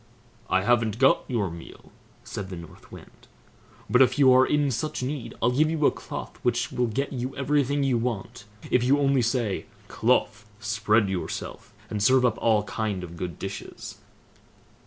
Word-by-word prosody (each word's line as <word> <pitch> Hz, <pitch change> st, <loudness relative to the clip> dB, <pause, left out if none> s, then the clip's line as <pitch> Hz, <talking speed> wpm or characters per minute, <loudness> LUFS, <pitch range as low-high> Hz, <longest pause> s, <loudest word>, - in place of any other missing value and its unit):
"I 95 Hz, 0 st, +2 dB
haven't 115 Hz, -1 st, +2 dB
got 130 Hz, +2 st, +4 dB
your 105 Hz, -8 st, -1 dB
meal", 85 Hz, 0 st, -12 dB, 0.3 s
said 100 Hz, -2 st, -6 dB
the 95 Hz, -, -6 dB
North 85 Hz, -1 st, -12 dB
Wind; -, -, -14 dB, 0.6 s
"but 125 Hz, -, +4 dB
if 130 Hz, -, +4 dB
you 135 Hz, -3 st, +6 dB
are 130 Hz, +1 st, +5 dB
in 145 Hz, -2 st, +1 dB
such 150 Hz, +3 st, -3 dB
need, 135 Hz, -1 st, -4 dB
I'll 120 Hz, -, +4 dB
give 155 Hz, +5 st, +2 dB
you 155 Hz, -2 st, 0 dB
a -, -, +5 dB
cloth -, -, -8 dB
which 120 Hz, -1 st, 0 dB
will 125 Hz, -1 st, 0 dB
get 135 Hz, +6 st, -2 dB
you 130 Hz, +1 st, -4 dB
everything 140 Hz, 0 st, +1 dB
you 130 Hz, -4 st, +1 dB
want, 115 Hz, -3 st, -4 dB, 0.3 s
if 125 Hz, -, +3 dB
you 135 Hz, +3 st, +4 dB
only 140 Hz, -2 st, +2 dB
say, 115 Hz, -4 st, -1 dB, 0.2 s
"Cloth, 110 Hz, -, 0 dB
spread 110 Hz, 0 st, +1 dB
yourself, 95 Hz, -2 st, -5 dB, 0.2 s
and 105 Hz, -, -4 dB
serve 130 Hz, +4 st, +4 dB
up 115 Hz, -3 st, +1 dB
all 110 Hz, -2 st, +3 dB
kind 105 Hz, -3 st, -3 dB
of 85 Hz, -1 st, -8 dB
good 85 Hz, -1 st, -5 dB
dishes!" -, -, -7 dB
120 Hz, 175 wpm, -26 LUFS, 105-135 Hz, 0.6 s, you